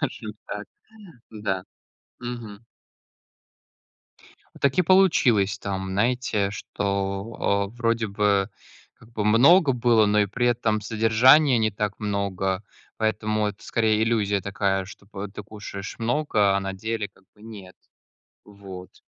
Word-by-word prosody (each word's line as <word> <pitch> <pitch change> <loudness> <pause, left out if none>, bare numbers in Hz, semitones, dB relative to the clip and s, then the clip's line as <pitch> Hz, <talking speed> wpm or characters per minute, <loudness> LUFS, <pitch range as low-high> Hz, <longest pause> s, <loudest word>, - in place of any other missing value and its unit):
Скажу - - -4 0.2
так, - - -5 0.6
да. 100 -4 -3 0.6
Мгм. 120 -4 -7 2.0
Так 140 +4 +1
и - - +6
получилось 125 - +3
там, 95 -1 -4
знаете, 105 0 0
что, 100 0 -2
э, - - -19
вроде 115 -1 0
бы, 100 -1 +1 0.5
как 115 - -20
бы, 105 -2 -2
много 135 - +6
было, 115 -3 +3
но 105 +1 +3
и 105 - +2
при 120 +5 -1
этом 115 -3 +1
содержания 115 +6 +4
не 110 -2 +1
так 105 0 -3
много, 100 -2 -2 0.3
поэтому 110 -1 0
это, 105 - -9
скорее, 110 -1 +1
иллюзия 105 -3 +1
такая, 95 0 -1
чтоб 95 +1 -14 0.3
ты 105 - -6
кушаешь 100 -1 -8
много, 115 -5 +1
а - - 0
на 95 0 -4
деле, 110 +2 -3
как 95 - -27
бы, 105 - -21
нет. 100 -5 -11 0.7
Вот. 95 -3 -11
105 Hz, 130 wpm, -24 LUFS, 100-115 Hz, 2.0 s, и